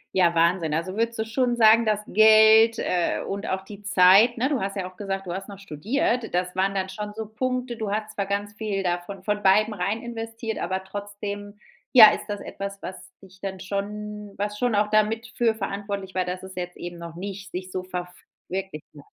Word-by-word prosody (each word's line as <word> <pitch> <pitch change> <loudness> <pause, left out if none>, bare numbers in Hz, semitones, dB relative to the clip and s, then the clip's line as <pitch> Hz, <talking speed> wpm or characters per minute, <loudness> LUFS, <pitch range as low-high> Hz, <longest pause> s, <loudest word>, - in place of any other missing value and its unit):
Ja, 175 -2 +4
Wahnsinn. 165 -1 +2
Also, 185 +5 -2
würdest 230 0 0
du 220 - 0
schon 245 +2 0
sagen, 225 0 +6
dass 210 -1 +1
Geld, 220 +2 +6
äh, 175 -2 0
und 200 +2 -4
auch 190 0 -1
die 200 +1 -11
Zeit, 200 +4 +5
ne, 260 +4 +1
du 280 - 0
hast 195 -1 -3
ja 190 -2 -3
auch - - -26
gesagt: 195 -1 -4
„Du 175 - -4
hast 195 +2 -6
noch 200 - -9
studiert“, 225 - -1
das 180 0 -1
waren 195 +1 0
dann 190 -1 -1
schon 210 +2 -6
so 220 0 -4
Punkte. 250 +2 -3
Du 215 -3 -3
hattest 215 0 -3
zwar 200 - -1
ganz 200 +1 -2
viel 205 -2 -3
davon 180 +2 -3
von 210 - -1
von 205 - -11
beidem 210 +3 +4
rein 200 +4 -2
investiert, 225 -1 -5
aber 190 +2 -2
trotzdem, 205 +1 -7 0.4
ja, 220 -4 +11
ist - - -4
das 205 -1 -4
etwas, 200 0 -7
was 185 - -6 0.2
dich 190 -1 -17
dann 190 -1 -5
schon, 210 +1 -5
was 210 +1 -3
schon 245 -3 +1
auch 210 +1 +2
damit 215 +2 +1
für 230 -2 +2
verantwortlich 200 -2 -4
war, 185 -1 0
dass 180 +1 -5
es 190 0 -10
jetzt 180 -1 -5
eben 175 0 -7
noch 170 -1 -9
nicht 195 +1 -7
sich 185 0 -6
so 185 - -3
ver 185 -1 -4
f 180 0 -15 0.3
wirklicht 190 -4 -4
hat? 140 - -13
200 Hz, 220 wpm, -25 LUFS, 185-220 Hz, 0.4 s, ja